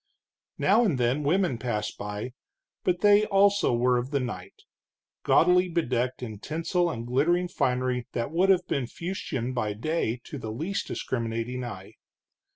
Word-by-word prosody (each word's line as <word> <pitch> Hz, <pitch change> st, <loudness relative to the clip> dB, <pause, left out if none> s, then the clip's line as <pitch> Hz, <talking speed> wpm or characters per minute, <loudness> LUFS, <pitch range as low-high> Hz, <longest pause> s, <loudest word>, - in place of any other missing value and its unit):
Now 240 Hz, -, +4 dB
and 180 Hz, -, +1 dB
then 125 Hz, +4 st, +1 dB
women 155 Hz, -3 st, +1 dB
passed, 105 Hz, -4 st, -2 dB
but 125 Hz, -, -5 dB
they, 205 Hz, 0 st, +6 dB
also, 200 Hz, -3 st, +4 dB
were 125 Hz, +1 st, +2 dB
of 125 Hz, +2 st, -4 dB
the 140 Hz, -1 st, 0 dB
night, 120 Hz, -8 st, -6 dB, 0.6 s
gaudily 180 Hz, +1 st, +4 dB
bedecked 125 Hz, -7 st, -1 dB
in 110 Hz, -4 st, -6 dB
tinsel 165 Hz, -, -1 dB
and 115 Hz, -7 st, -5 dB
glittering 165 Hz, +9 st, +2 dB
finery 125 Hz, -4 st, -1 dB
that 120 Hz, +3 st, -2 dB
would 180 Hz, +4 st, +2 dB
have 185 Hz, -2 st, +4 dB
been 135 Hz, -4 st, -1 dB
fustian 135 Hz, -7 st, -4 dB
by 110 Hz, -4 st, -1 dB
day 125 Hz, 0 st, -1 dB
to 145 Hz, -, -7 dB
the 110 Hz, -, -6 dB
least 160 Hz, -, -3 dB
discriminating 115 Hz, +1 st, -3 dB
eye. 100 Hz, -5 st, -8 dB
130 Hz, 150 wpm, -27 LUFS, 120-175 Hz, 0.6 s, they